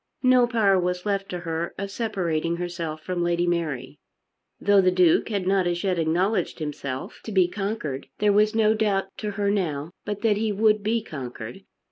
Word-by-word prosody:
No 255 -1 +5
power 210 -5 +3
was 180 +1 -2
left 200 -1 -1
to 180 -1 -4
her 165 0 -3
of 200 0 -4
separating 170 -7 -1
herself 170 -3 -4
from 180 0 -2
Lady 175 0 +1
Mary. 150 -6 -2 0.6
Though 200 0 +5
the 185 - +4
Duke 180 0 +3
had 200 -4 -1
not 190 -1 +2
as 175 0 -1
yet 185 -3 +1
acknowledged 180 +4 +1
himself 140 -4 -5
to 220 - -6
be 190 -3 +4
conquered, 185 -8 -4
there 210 -1 +3
was 210 +2 +3
no 220 -1 +4
doubt 195 -3 0
to 210 - -3
her 200 0 0
now 165 -6 -1
but 205 -1 -4
that 215 -3 +3
he 220 0 0
would 215 +1 +3
be 220 +2 0
conquered. 125 - -7
185 Hz, 185 wpm, -25 LUFS, 170-210 Hz, 0.6 s, No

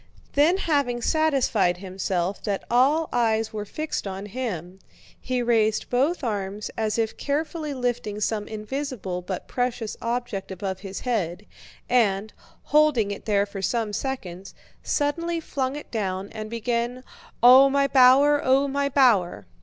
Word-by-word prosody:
Then 310 +6 +4
having 285 -9 0
satisfied 270 - +2
himself 185 0 -3
that 200 -2 -2
all 285 +7 +3
eyes 225 -2 +1
were 210 -1 -4
fixed 305 0 -4
on 195 +1 -5
him, 190 -6 -5 0.4
he 250 -1 -2
raised 220 -2 +1
both 280 +7 +1
arms 205 -2 -3
as 220 0 -1
if 225 -1 -1
carefully 305 +1 -2
lifting 245 -4 -2
some 210 0 -1
invisible 215 -4 -4
but 180 0 -6
precious 245 -3 -2
object 235 -4 -3
above 190 0 -4
his 195 -1 -7
head 205 -6 -2 0.4
and, 215 -4 +1 0.3
holding 295 -9 +3
it 200 - -7
there 205 -2 +2
for 200 -1 -7
some 220 +2 -1
seconds, 195 -7 -5 0.3
suddenly 335 +3 -1
flung 270 -4 -3
it 295 - -9
down 195 -3 -3
and 215 -1 -6
began: 235 +2 -2 0.4
"Oh, 260 +3 +9
my 280 0 +2
bower, 275 +2 +6
oh, 270 +2 +3
my 280 0 0
bower...!" 205 - +3
235 Hz, 140 wpm, -24 LUFS, 200-270 Hz, 0.4 s, Oh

